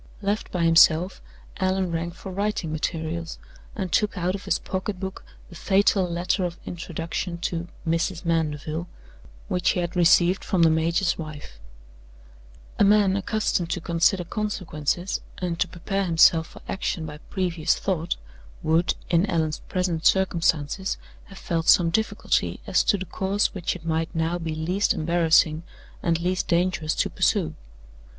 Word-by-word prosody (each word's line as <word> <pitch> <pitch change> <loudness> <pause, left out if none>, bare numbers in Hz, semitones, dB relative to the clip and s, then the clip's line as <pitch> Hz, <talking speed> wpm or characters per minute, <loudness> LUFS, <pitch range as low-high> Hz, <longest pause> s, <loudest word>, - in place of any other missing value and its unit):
Left 205 +2 -1
by 175 -2 -1
himself, 165 +2 +5 0.4
Allan 185 -1 0
rang 165 +1 -2
for 180 +2 -9
writing 200 -4 -2
materials, 160 +1 -3 0.4
and 190 -5 -3
took 210 +4 +1
out 180 +1 0
of 200 - -6
his - - +1
pocket 190 0 -4
book 190 0 -6 0.3
the 170 - -12
fatal 195 0 +2
letter 175 +2 0
of 175 -1 -3
introduction 170 +1 -4
to 175 -1 -2 0.2
"Mrs. 165 +2 -1
Mandeville" 160 0 -1 0.6
which 180 -1 +1
he - - +1
had 175 0 -3
received 175 +1 +4
from 180 -3 +2
the 165 - +6
major's 170 +4 +1
wife. 150 - -8 1.2
A - - +6
man 200 -1 +4
accustomed 200 -4 0
to 175 - -1
consider 170 +3 +2
consequences 180 -3 -2 0.2
and 175 -2 -3
to 180 - +2
prepare 190 +3 -2
himself 165 -1 +5
for - - -15
action 175 -4 -2
by 150 -1 -8
previous 175 -4 0
thought 175 -3 -1 0.5
would, 165 +3 +2 0.2
in 175 +4 +3
Allan's 160 -3 0
present 180 -4 +1
circumstances, 175 -1 +1 0.3
have 195 - -13
felt 165 -3 -2
some 170 -2 +6
difficulty 220 +5 0
as - - +2
to 205 - +3
the 190 - -5
course 195 +3 0
which 180 -3 -2
it 165 -2 -11
might 160 +1 -1
now 165 +2 0
be 160 -2 -3
least 180 +6 0
embarrassing 160 -1 +3 0.4
and 165 -1 +1
least 180 +2 -1
dangerous 170 -2 +1
to - - +1
pursue. 75 - +1
175 Hz, 150 wpm, -25 LUFS, 165-190 Hz, 1.2 s, the